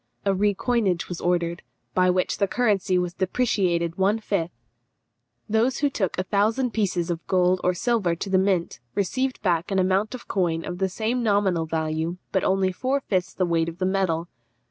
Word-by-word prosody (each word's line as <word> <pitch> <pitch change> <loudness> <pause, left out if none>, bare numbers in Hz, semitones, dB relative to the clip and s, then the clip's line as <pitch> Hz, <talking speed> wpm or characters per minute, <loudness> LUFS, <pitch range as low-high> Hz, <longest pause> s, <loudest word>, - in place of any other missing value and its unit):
A 195 - +3
recoinage 205 -1 +1
was 175 - -5
ordered, 170 -1 0 0.3
by 185 0 +3
which 180 0 0
the 200 - +3
currency 200 -5 +1
was 180 -1 -1
depreciated 185 -4 0
one 200 +3 +3
fifth; 200 -6 -1 1.0
those 230 +4 +2
who 285 -1 +1
took 190 -8 -1
a 185 - 0
thousand 220 +6 +1
pieces 185 -5 0
of 170 -1 -4
gold 185 0 +2
or 180 0 +2
silver 195 -3 +1
to 195 - -5
the 185 - +4
mint 190 -3 0 0.2
received 255 +7 -1
back 175 -3 +1
an 195 - 0
amount 190 +5 +1
of 250 - -11
coin 170 -4 0
of 180 0 -5
the 190 -1 +1
same 225 +6 -1
nominal 200 -7 +1
value, 160 +2 -2
but 190 - +1
only 190 0 +2
four 260 +9 -1
fifths 185 -6 -1
of - - -35
the 185 - +2
weight 165 -1 +1
of 170 +2 -11
metal. 185 -3 0
185 Hz, 185 wpm, -24 LUFS, 175-210 Hz, 1.0 s, the